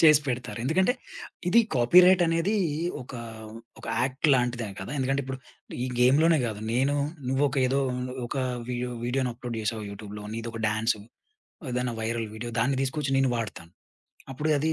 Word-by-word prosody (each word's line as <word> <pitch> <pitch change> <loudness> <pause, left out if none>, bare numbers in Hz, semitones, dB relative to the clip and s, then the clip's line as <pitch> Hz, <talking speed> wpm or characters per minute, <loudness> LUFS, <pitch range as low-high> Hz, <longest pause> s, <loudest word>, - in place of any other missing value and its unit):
చేసి 155 -3 +7
పెడతారు. 120 -5 -3
ఎందుకంటే 185 - +3 0.6
ఇది 235 +6 +6
కాపీరైటనేదీ 175 - +5 0.5
ఒకా 125 -1 -8 0.6
ఒక - - -10 0.2
యాక్ట్‌లాంటిదే 125 -4 +1
కదా! 95 - -6
ఎందుకంటే 135 +1 +1
ఇప్పుడు 130 0 -5 0.5
ఈ - - -1
గేమ్‌లోనే 150 +6 +5
గాదు. 110 -2 -3
నేను 135 +4 +2 0.3
నువ్వొక 135 +1 +1
ఏదో 135 +2 +1 0.5
ఒక 120 - -5 0.3
వీడియో 125 0 -2
వీడియోని 125 0 0
అప్‌లోడ్ 120 -1 -6
చేసావు 110 0 -2
యూట్యూబ్‌లో. 105 +1 -8
నీదొక 115 0 -5
డాన్సు, 110 0 0 0.7
ఏదైనా 125 -1 -1
వైరల్ 115 0 -1
వీడియో 120 +2 -5
దాన్ని 130 +2 +1
దీసుకొచ్చి 135 +1 -1
నేను 135 -2 +3
వాడతాను. 90 -7 -5 0.6
అప్పుడది 155 +3 +1
125 Hz, 135 wpm, -27 LUFS, 115-145 Hz, 0.7 s, చేసి